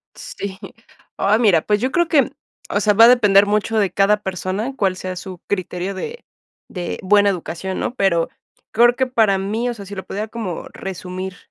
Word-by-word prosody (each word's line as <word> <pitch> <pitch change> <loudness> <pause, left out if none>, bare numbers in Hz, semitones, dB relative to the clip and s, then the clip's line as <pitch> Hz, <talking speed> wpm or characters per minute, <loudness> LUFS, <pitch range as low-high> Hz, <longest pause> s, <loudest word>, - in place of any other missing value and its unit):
Sí. 195 -1 -7 0.6
Oh 205 +2 +3
mira, 200 -9 +4
pues 210 +4 0
yo 255 - 0
creo 345 +1 +2
que 285 -7 +3 0.4
o 205 - 0
sea 210 0 +3
va 225 +3 +8
a - - +8
depender 205 -5 +5
mucho 210 +2 0
de 200 -3 +2
cada 200 +2 +3
persona, 190 +6 -3
cual 195 -7 0
sea 185 0 -5
su 185 -1 -8
criterio 185 0 -3
de 455 - -7 0.5
de 175 -2 -5
buena 205 +1 +4
educación 185 0 -4
¿no? - - -2
Pero 170 -7 +1 0.4
creo 240 +2 +4
que 260 - +1
para 220 -6 +2
mí, 215 +6 -2
o - - -2
sea, 200 -4 -10
si 205 - -9
lo 190 - -6
pudiera 210 +3 -4
como 215 -6 -5
resumir 185 0 -6
200 Hz, 195 wpm, -20 LUFS, 185-220 Hz, 0.6 s, va